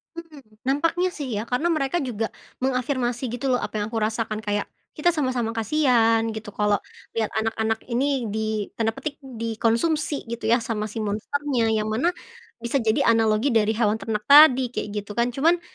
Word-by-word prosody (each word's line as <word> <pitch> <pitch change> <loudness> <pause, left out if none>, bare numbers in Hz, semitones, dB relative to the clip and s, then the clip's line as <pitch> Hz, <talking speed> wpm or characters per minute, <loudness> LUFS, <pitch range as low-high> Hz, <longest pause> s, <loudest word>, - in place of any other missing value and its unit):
Mmm, 330 -4 -10 0.3
nampaknya 330 +6 +1
sih, 290 -5 -6
ya, 205 - -2
karena 250 +7 +1
mereka 310 -2 0
juga 230 -6 -2 0.4
mengafirmasi 255 -1 -1
gitu 245 +2 -4
loh, 250 - +2
apa - - -5
yang - - -1
aku 225 - -1
rasakan, 220 -1 -3
kayak 205 -1 -2 0.3
kita 350 +3 +3
sama-sama 255 -7 -1
kasihan 230 -2 +3
gitu, 215 -1 -7
kalau 205 0 +1 0.3
lihat 225 -2 0
anak-anak 220 0 0
ini 260 +1 0
di 215 -1 -1
tanda 225 -1 0
petik, 280 +1 -5
dikonsumsi 235 +5 -1
gitu, 235 -1 -4
ya, 235 - +5
sama 220 -3 -3
si 210 - -8
monsternya. 235 +3 -1
Yang 215 -1 0
mana, 265 +11 +2 0.5
bisa 235 +2 -1
jadi 220 0 +1
analogi 225 +3 +3
dari 215 -2 +3
hewan 220 -1 +1
ternak 210 -2 -3
tadi, 265 -4 +7
kek 210 - -3
gitu, 205 0 -5
kan. 235 +3 +1
Cuman, 325 +8 +2
235 Hz, 170 wpm, -24 LUFS, 220-275 Hz, 0.5 s, tadi